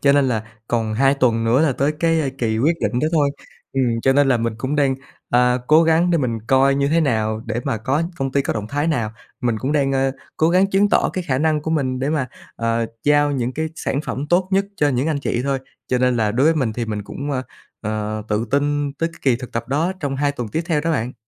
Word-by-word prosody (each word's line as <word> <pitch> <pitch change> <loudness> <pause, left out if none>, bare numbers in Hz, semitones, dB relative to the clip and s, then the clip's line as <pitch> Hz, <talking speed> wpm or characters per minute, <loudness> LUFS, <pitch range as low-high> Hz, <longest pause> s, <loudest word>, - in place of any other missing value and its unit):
cho 140 -1 +4
nên 140 -2 +3
là 110 -3 0 0.3
còn 115 -2 0
2 135 +4 +3
tuần 115 -4 +1
nữa 120 +5 +3
là 155 -4 +3
tới 140 +4 0
cái, 165 -1 +3
a, 140 - -1
kỳ 110 -3 0
quyết 160 +7 +2
định 105 - 0
đó 155 - +1
thôi. 145 -3 +3 0.4
Ừm, 125 -4 +1
cho 135 - +4
nên 140 0 +3
là 125 - +4
mình 115 -1 -2
cũng 135 +4 -2
đang, 140 -2 +2 0.4
ờ, 125 +1 +3
cố 155 +2 +6
gắng 165 +2 +3
để 170 - +3
mình 120 -4 -1
coi 135 +1 +4
như 140 0 +1
thế 165 +3 +3
nào 110 -6 0
để 115 +2 -2
mà - - 0
có 135 +8 0
công 135 -1 -2
ty 140 0 +2
có - - -1
động 105 -1 -4
thái 145 +4 -1
nào. 120 -10 0 0.3
Mình 120 -3 0
cũng 135 +6 -2
đang, 140 -2 +1
a, 135 0 +2 0.3
cố 160 - +3
gắng 185 +3 +3
chứng 195 +1 +3
tỏ - - +3
cái 185 -2 -3
khả 130 -3 +1
năng 155 0 +1
của 160 - -3
mình 130 -5 0
để 135 +2 -1
mà, 145 -5 0 0.3
ờ, 115 0 0 0.2
giao 145 0 +4
những 125 -2 -1
cái 160 +2 -2
sản 140 - -2
phẩm 140 +3 -4
tốt 180 +1 +3
nhất 195 +1 +3
cho 145 - +2
những 130 +1 0
anh 150 -3 -1
chị 120 - -1
thôi. 140 -1 0 0.3
Cho 125 - +1
nên 125 -1 +2
là 105 -2 +1
đối 130 +5 +2
với 165 - +4
mình 130 -8 0
thì 120 +1 -3
mình 105 -2 -4
cũng, 140 +7 -6
ờ, 130 -2 -1 0.4
ờ, 110 0 -3
tự 105 +2 0
tin 145 0 +1
tới 165 +3 -2
cái - - -15
kỳ 130 -4 +3
thực 125 0 -9
tập 115 - -3
đó 160 +7 +1
trong 140 -3 -2
2 145 0 +1
tuần 120 -5 -5
tiếp 160 +10 -2
theo 155 -3 +1
đó 165 +2 -1
bạn. 125 -2 -1
135 Hz, 270 wpm, -21 LUFS, 120-150 Hz, 0.4 s, cố